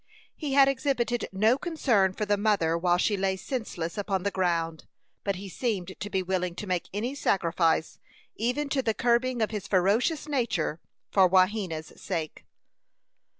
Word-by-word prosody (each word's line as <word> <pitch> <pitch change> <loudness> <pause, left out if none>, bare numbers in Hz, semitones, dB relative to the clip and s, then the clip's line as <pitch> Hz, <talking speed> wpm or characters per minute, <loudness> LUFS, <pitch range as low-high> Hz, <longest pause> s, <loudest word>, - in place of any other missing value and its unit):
He 295 -4 -3
had 275 0 +7
exhibited 255 -4 0
no 220 +7 +3
concern 240 - +2
for 210 - -2
the 205 0 +2
mother 200 -6 +2
while 175 +1 +2
she 205 +3 +1
lay 190 -1 0
senseless 195 - -4
upon 195 -2 -1
the 200 - 0
ground, 170 -4 -1 0.4
but 200 -1 0
he 195 +2 -7
seemed 190 -3 -2
to 205 - -4
be 190 -2 0
willing 180 -1 -1
to 210 - -6
make 180 -3 -2
any 225 +7 -2
sacrifice, 170 - +1 0.4
even 250 +6 -1
to 275 -1 +1
the 225 -4 0
curbing 240 0 +2
of 215 - -1
his 205 -2 -4
ferocious 210 - +2
nature, 230 - -1 0.3
for 190 -2 +5
Wahena's 185 -4 +1
sake. 165 -5 -4
200 Hz, 160 wpm, -27 LUFS, 180-240 Hz, 0.4 s, had